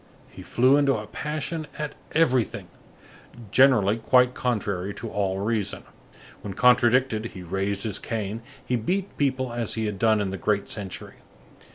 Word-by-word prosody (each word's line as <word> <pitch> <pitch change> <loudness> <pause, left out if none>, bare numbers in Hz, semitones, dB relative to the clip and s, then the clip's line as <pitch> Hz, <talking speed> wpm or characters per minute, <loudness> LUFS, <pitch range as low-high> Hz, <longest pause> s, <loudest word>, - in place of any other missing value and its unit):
He - - -11
flew 130 +3 +3
into 140 -2 +3
a 105 - -4
passion 155 +6 -4
at 150 -1 -4 0.2
everything, 130 - +1 0.8
generally 115 -6 +5
quite 125 +2 +4
contrary 100 -6 -2
to - - -7
all 95 -2 -1
reason. 105 0 -2 0.6
When 100 -2 -6
contradicted, 125 -2 +4
he 95 -5 -8
raised 95 +3 -2
his 105 -2 -3
cane; 110 0 -4 0.2
he 125 - 0
beat 185 - -2
people 130 -3 0
as 120 -2 -1
he 110 -1 -1
had 105 -2 -3
done 110 -1 +3
in 100 -2 -1
the 95 - -4
great 100 +2 0
century. 100 -3 -7
115 Hz, 155 wpm, -25 LUFS, 100-130 Hz, 0.8 s, generally